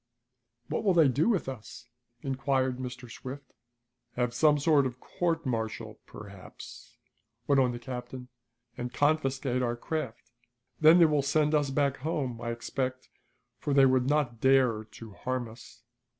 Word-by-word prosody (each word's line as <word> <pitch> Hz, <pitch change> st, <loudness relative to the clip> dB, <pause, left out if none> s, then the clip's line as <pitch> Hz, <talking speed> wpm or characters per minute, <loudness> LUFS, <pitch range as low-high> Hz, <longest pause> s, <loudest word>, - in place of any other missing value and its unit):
"What -, -, -2 dB
will 195 Hz, -4 st, +3 dB
they 160 Hz, -4 st, +6 dB
do 145 Hz, -, +2 dB
with 200 Hz, -, 0 dB
us?" 125 Hz, -1 st, -8 dB, 0.4 s
inquired 130 Hz, -1 st, 0 dB
Mr. 125 Hz, 0 st, -6 dB
Swift. 130 Hz, +3 st, -9 dB, 0.6 s
"Have 125 Hz, -1 st, 0 dB
some 150 Hz, +3 st, +4 dB
sort 145 Hz, -2 st, +3 dB
of 125 Hz, -, -6 dB
a -, -, -37 dB
court 170 Hz, +5 st, -2 dB
martial, 110 Hz, -2 st, -3 dB
perhaps," 100 Hz, -3 st, -12 dB, 0.5 s
went 140 Hz, 0 st, +4 dB
on 125 Hz, -1 st, +2 dB
the 120 Hz, -, -5 dB
captain, 125 Hz, +1 st, -7 dB, 0.5 s
"and 120 Hz, +1 st, -5 dB
confiscate 135 Hz, -3 st, +1 dB
our 120 Hz, -1 st, 0 dB
craft. 120 Hz, -4 st, -5 dB, 0.5 s
Then 160 Hz, +2 st, +7 dB
they 170 Hz, -, +7 dB
will 150 Hz, -2 st, +2 dB
send 150 Hz, +2 st, +1 dB
us 145 Hz, -2 st, +2 dB
back 140 Hz, 0 st, +1 dB
home, 130 Hz, -5 st, -3 dB
I 120 Hz, -, -3 dB
expect 130 Hz, +2 st, -4 dB, 0.5 s
for 145 Hz, -, -1 dB
they 135 Hz, -1 st, +7 dB
would 130 Hz, 0 st, +2 dB
not 135 Hz, -6 st, 0 dB
dare 125 Hz, -5 st, +3 dB, 0.4 s
harm 130 Hz, -1 st, -2 dB
us." 115 Hz, 0 st, -14 dB
130 Hz, 150 wpm, -29 LUFS, 120-145 Hz, 0.6 s, Then